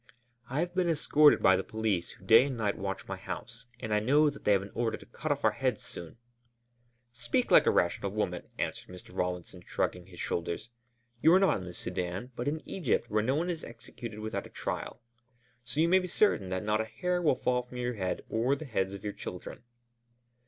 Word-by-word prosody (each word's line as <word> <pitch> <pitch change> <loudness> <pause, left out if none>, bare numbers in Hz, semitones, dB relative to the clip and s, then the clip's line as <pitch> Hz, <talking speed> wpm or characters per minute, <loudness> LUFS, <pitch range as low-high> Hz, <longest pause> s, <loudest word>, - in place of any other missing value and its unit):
"I 135 +5 0
have 175 0 -2
been 180 -2 +1
escorted 150 -1 +5
by 95 - +7
the - - -1
police 110 -6 -1
who 95 - -14
day 115 +6 +8
and 130 -3 -4
night 105 -3 0
watch 95 0 -4
my 95 - -4
house, 115 +5 -7
and 110 -4 -3
I 105 - +4
know 145 +7 +4
that 140 - -13
they 105 - +5
have 100 -1 +2
an 100 - -10
order 115 -1 -1
to - - -14
cut 150 +6 -4
off 145 0 -1
our 110 - +6
heads 120 +1 -1
soon!" 85 +5 -8 1.0
"Speak 120 +1 0
like - - +7
a - - +8
rational 90 +3 +1
woman," 95 -4 -2
answered - - -3
Mr. 90 0 -12
Rawlinson, 90 0 -3
shrugging 90 0 -2
his 90 -2 -13
shoulders. 85 +7 -3 0.5
"You 160 - +6
are - - +7
not 195 - +4
in 90 - -7
the 90 - -7
Sudân, 90 +7 -4
but 120 - -3
in 155 +2 -2
Egypt 170 - -1
where 105 0 +3
no 130 +5 +1
one 170 +4 0
is 165 -2 -5
executed 115 -2 -8
without 110 0 -3
a - - -18
trial. 120 - -5 0.6
So 125 +4 -4
you 165 - +5
may 185 +2 +5
be 180 - -4
certain 170 - +2
that 95 +1 -2
not 105 +1 +1
a - - -2
hair 180 +11 -1
will 155 -6 +3
fall 125 0 +1
from 125 0 -11
your 125 0 -1
head 95 -5 -2
or 120 +5 +1
the 155 - -7
heads 95 -6 -1
of 100 - -10
your 105 -1 -3
children." 90 - -7
115 Hz, 225 wpm, -30 LUFS, 95-140 Hz, 1.0 s, day